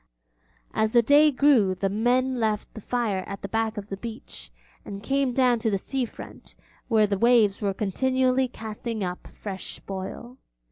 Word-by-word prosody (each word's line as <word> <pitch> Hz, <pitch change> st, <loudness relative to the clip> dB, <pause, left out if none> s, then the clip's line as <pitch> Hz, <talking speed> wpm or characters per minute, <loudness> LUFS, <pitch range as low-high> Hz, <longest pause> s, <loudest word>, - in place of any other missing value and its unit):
As 220 Hz, 0 st, +1 dB
the 235 Hz, -1 st, +5 dB
day 290 Hz, +5 st, +6 dB
grew 255 Hz, -9 st, +3 dB
the 195 Hz, +2 st, -1 dB
men 245 Hz, +5 st, +1 dB
left 215 Hz, -2 st, -1 dB
the 220 Hz, -, -9 dB
fire 215 Hz, -5 st, -1 dB
at 200 Hz, -, -7 dB
the -, -, -3 dB
back 225 Hz, +1 st, -1 dB
of 205 Hz, 0 st, -6 dB
the 195 Hz, -, -4 dB
beach, 230 Hz, +2 st, -8 dB, 0.3 s
and 200 Hz, 0 st, -8 dB
came 275 Hz, +1 st, +1 dB
down 245 Hz, -2 st, +3 dB
to 225 Hz, 0 st, 0 dB
the 200 Hz, -, +1 dB
sea 260 Hz, +6 st, -2 dB
front -, -, -12 dB, 0.3 s
where 220 Hz, -3 st, +4 dB
the 200 Hz, -1 st, -1 dB
waves 230 Hz, -4 st, +4 dB
were 200 Hz, -2 st, -1 dB
continually 260 Hz, +5 st, +1 dB
casting 220 Hz, -1 st, -5 dB
up 180 Hz, -1 st, -5 dB
fresh 195 Hz, -2 st, -7 dB
spoil. 200 Hz, +6 st, -7 dB
225 Hz, 175 wpm, -25 LUFS, 200-250 Hz, 0.3 s, day